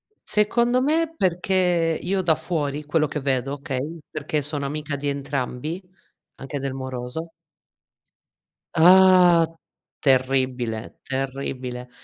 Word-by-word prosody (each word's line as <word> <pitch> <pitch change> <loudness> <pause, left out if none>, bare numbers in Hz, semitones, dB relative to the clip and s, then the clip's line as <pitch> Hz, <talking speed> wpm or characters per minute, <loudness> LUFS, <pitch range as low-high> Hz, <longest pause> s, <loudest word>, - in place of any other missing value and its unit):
Secondo 235 - +2
me 320 +4 +1
perché, 180 - +1
io 190 +2 0
da 170 -3 +3
fuori 150 -4 -3
quello 155 +1 +1
che 150 +1 -4
vedo, 135 0 0
okay, 145 +3 -4
perché 155 0 -2
sono 145 0 -3
amica 150 +1 -3
di 145 +1 -4
entrambi, 140 +3 -3 0.5
anche 135 +1 -6
del 135 -1 -3
moroso 130 +4 -6 1.4
Ah, 180 0 +7 0.5
terribile, 130 -4 0
terribile, 130 -2 -4
145 Hz, 105 wpm, -23 LUFS, 135-175 Hz, 1.4 s, Ah